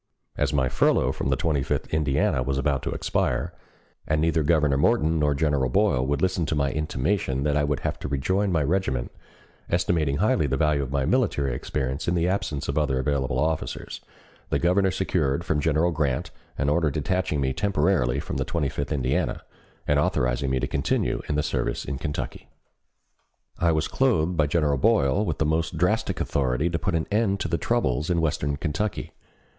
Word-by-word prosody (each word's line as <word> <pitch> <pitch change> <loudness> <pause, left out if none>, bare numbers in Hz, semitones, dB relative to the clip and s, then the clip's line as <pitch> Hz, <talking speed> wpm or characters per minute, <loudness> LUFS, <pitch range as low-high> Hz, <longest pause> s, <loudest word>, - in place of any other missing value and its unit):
As 75 -1 0
my 65 -3 +2
furlough - - +2
from - - -3
the 65 - +3
Twenty 75 +1 0
fifth 65 - -3
Indiana 70 -4 +1
was 65 +1 -1
about 70 -1 0
to - - -3
expire, - - -1 0.5
and 75 0 +1
neither 80 0 +2
Governor 75 -2 +2
Morton 80 0 +2
nor 75 -1 +2
General 70 -3 +1
Boyle 65 +1 +2
would 70 +3 -1
listen 90 -3 +1
to 75 - -1
my 70 -2 +1
intimation 75 -1 -1
that 75 -1 +1
I 75 - +2
would 75 -1 -1
have - - -3
to - - -5
rejoin 95 +9 0
my 80 -4 +2
regiment, 70 -6 -1 0.6
estimating 80 -5 +1
highly 105 - +2
the 65 0 0
value 75 0 +2
of 65 -2 -4
my 70 -1 0
military 70 -1 +1
experience 65 +3 -3
in 85 - +1
the 85 0 +1
absence 85 -7 -2
of 70 +2 0
other 65 -3 0
available 65 0 0
officers, 80 0 -2 0.5
the - - +1
Governor 95 +3 +2
secured 85 -6 0
from 75 -3 0
General 80 +3 +2
Grant 75 -5 -1 0.3
an 70 - 0
order 80 +1 +2
detaching 80 +2 -1
me 65 -1 0
temporarily 75 -7 +1
from - - -4
the - - 0
Twenty 75 -5 +1
fifth 70 +3 -4
Indiana, 65 -3 -1 0.4
and 75 0 +3
authorizing 65 -1 0
me 65 -1 +1
to - - 0
continue - - 0
in 75 - 0
the 75 - +1
service 75 - -2
in 70 -2 -4
Kentucky. 75 -1 -5 1.1
I 85 -1 +3
was 80 -1 0
clothed 90 -10 +1
by 75 -2 +2
General 75 -3 +1
Boyle 70 +10 +3
with 80 -8 -2
the 80 - +1
most 80 +2 0
drastic - - 0
authority 70 +4 0
to 85 - -1
put 95 -4 -1
an 80 - 0
end 105 -2 +1
to - - -1
the 85 +1 -1
troubles 75 - 0
in 85 -1 +2
western 70 -3 -1
Kentucky. 95 +9 -3
75 Hz, 190 wpm, -25 LUFS, 70-85 Hz, 1.1 s, the